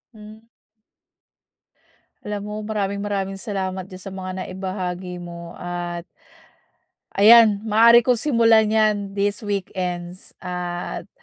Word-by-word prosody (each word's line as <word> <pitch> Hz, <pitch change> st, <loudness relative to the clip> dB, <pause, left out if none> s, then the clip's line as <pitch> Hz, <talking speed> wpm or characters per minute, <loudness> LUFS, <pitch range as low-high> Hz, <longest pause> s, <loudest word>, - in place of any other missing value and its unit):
Mm. 215 Hz, +1 st, -14 dB, 1.8 s
Alam 210 Hz, -1 st, -4 dB
mo, -, -, -5 dB
maraming 200 Hz, -2 st, -2 dB
maraming 195 Hz, -1 st, -3 dB
salamat 190 Hz, -3 st, -4 dB
diyan 185 Hz, -1 st, -11 dB
sa 195 Hz, -, -7 dB
mga 185 Hz, -1 st, -6 dB
naibahagi 185 Hz, -1 st, -5 dB
mo 170 Hz, -1 st, -9 dB
at, 175 Hz, -1 st, -5 dB, 1.1 s
ayan, 215 Hz, 0 st, +7 dB
maaari 230 Hz, +2 st, +6 dB
ko 250 Hz, -, +4 dB
simulan 230 Hz, -4 st, +3 dB
'yan 215 Hz, -1 st, +3 dB, 0.2 s
this 205 Hz, +2 st, 0 dB
weekends 180 Hz, -3 st, -5 dB
at 180 Hz, -1 st, -5 dB
195 Hz, 105 wpm, -22 LUFS, 180-215 Hz, 1.8 s, ayan